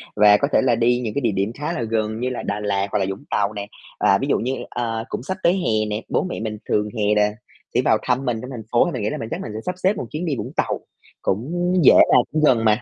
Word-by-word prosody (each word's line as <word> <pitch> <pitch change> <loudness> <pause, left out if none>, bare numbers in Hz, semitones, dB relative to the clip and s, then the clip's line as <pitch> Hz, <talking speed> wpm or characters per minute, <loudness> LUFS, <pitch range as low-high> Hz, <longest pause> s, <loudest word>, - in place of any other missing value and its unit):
và 105 0 +6
có 140 - +1
thể - - +5
là 125 -3 +3
đi 120 +2 +2
những 110 -3 -3
cái 140 - -1
địa 115 -4 +1
điểm 100 +3 -1
khá 150 +5 -4
là 125 - -3
gần 110 -1 -1
như 125 +1 -1
là 125 - -4
Đà 100 +1 -2
Lạt 100 -1 -1
hoặc 105 - +1
là 95 - +1
Vũng 95 - -6
Tàu 105 +1 0
nè. 100 0 -5 0.3
À, - - +4
ví - - -3
dụ - - +2
như, 130 +4 -1 0.2
ờ, 115 -2 -3
cũng - - -4
sắp 190 +6 -4
tới 170 - +5
hè 110 - 0
nè, 105 +2 -2
bố - - +1
mẹ 185 - -4
mình 110 -1 -4
thường 105 0 +1
hè 105 0 +2
là 105 0 +3 0.4
sẽ - - +3
vào - - +4
thăm 130 +2 0
mình 120 -3 -1
trong 125 - -8
thành 115 -3 -7
phố 120 - +4
thì - - -2
mình - - -4
nghĩ 105 - 0
là - - -4
mình 115 - -6
chắc - - -3
mình 110 - -6
sẽ 110 - -4
sắp 180 - -2
xếp 190 +3 +3
một 205 - -4
chuyến 160 +4 -3
đi 155 -5 -1
Vũng - - -5
Tàu, - - 0 0.4
cũng 175 - -1
dễ - - +8 0.2
mà, - - +8
cũng 155 0 0
gần 115 -6 +4
mà. 110 +2 +3
115 Hz, 305 wpm, -22 LUFS, 105-135 Hz, 0.4 s, dễ